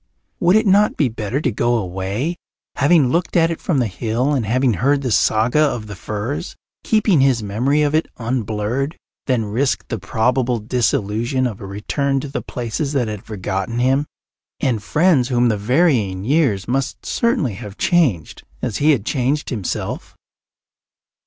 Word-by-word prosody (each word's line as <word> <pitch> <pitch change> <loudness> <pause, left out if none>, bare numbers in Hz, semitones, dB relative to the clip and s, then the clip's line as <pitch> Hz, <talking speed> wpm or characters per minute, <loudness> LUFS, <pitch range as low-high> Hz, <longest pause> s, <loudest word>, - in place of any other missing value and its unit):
Would 180 +3 +4
it 220 +1 +4
not 205 +2 +4
be 140 -5 +2
better 110 +3 -3
to 130 - 0
go 120 +3 +1
away, 100 - -3 0.4
having 145 -2 +4
looked 175 +2 0
at 165 0 +3
it 165 - -5
from 165 - 0
the 125 - +2
hill 115 +7 -1
and 125 -7 -1
having 125 +2 +2
heard 140 +8 +1
the 125 - -1
saga 110 +6 +2
of 130 -7 0
the 105 -1 -8
firs, 110 - -4 0.3
keeping 215 -8 +3
his 130 -5 +2
memory 125 +9 +1
of 145 0 +1
it 160 +1 +2
unblurred, 115 - -2 0.3
than 125 -4 +1
risk 125 +6 -1
the 115 - -3
probable 120 +5 0
disillusion 115 +2 0
of 110 -5 -4
a 100 - -7
return 135 +8 -1
to 145 - -6
the 135 - -4
places 125 +5 -3
that 130 -5 +1
had 105 -2 -5
forgotten 100 +1 -3
him 135 +4 +2 0.5
and 120 -6 0
friends 150 - +2
whom 120 -2 +2
the 110 - +1
varying 110 - +1
years 125 - +1
must 135 +2 -2
certainly 235 - 0
have 100 +1 -9
changed 140 - +1 0.2
as 120 -5 -3
he 150 +2 +2
had 115 -7 -2
changed 140 +3 -1
himself? 105 -8 -4
125 Hz, 165 wpm, -20 LUFS, 110-145 Hz, 0.5 s, Would